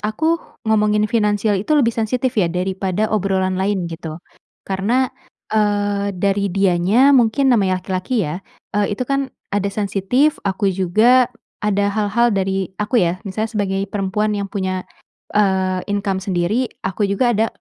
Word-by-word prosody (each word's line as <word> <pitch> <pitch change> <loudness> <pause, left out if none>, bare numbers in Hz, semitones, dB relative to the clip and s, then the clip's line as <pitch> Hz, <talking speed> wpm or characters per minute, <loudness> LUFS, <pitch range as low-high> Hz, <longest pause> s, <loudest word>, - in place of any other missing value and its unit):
aku 315 +11 0 0.3
ngomongin 210 -1 +2
finansial 210 -2 +1
itu 260 +11 0
lebih 235 -5 +3
sensitif 240 +3 -1
ya 175 -4 +3
daripada 190 +3 -1
obrolan 190 -2 0
lain, 195 -2 0
gitu, 160 -1 -6 0.5
karena, 225 +7 0 0.4
eee, 205 -1 +1
dari 200 +1 +1
dianya 195 +8 +3
mungkin 260 +2 +4
namanya 190 -5 +2
laki-laki 190 +4 -1
ya, 150 +5 -4 0.3
eee, 205 0 +1
itu - - -2
kan 275 0 -1 0.2
ada 200 0 0
sensitif, 205 +8 0
aku 195 0 +1
juga 215 +8 +4 0.3
ada 205 -1 +1
hal-hal 215 +3 +1
dari 190 -1 -1
aku 210 +1 +2
ya, 175 +1 0
misalnya 215 +3 -3
sebagai 195 -3 -1
perempuan 210 +1 -1
yang 200 -1 -3
punya, 190 -2 -2 0.5
eee, 190 -2 +2
income 200 -1 -1
sendiri, 195 +7 0 0.2
aku 195 +2 -1
juga 220 +5 +1
ada, 220 +2 +2
205 Hz, 145 wpm, -19 LUFS, 190-220 Hz, 0.5 s, mungkin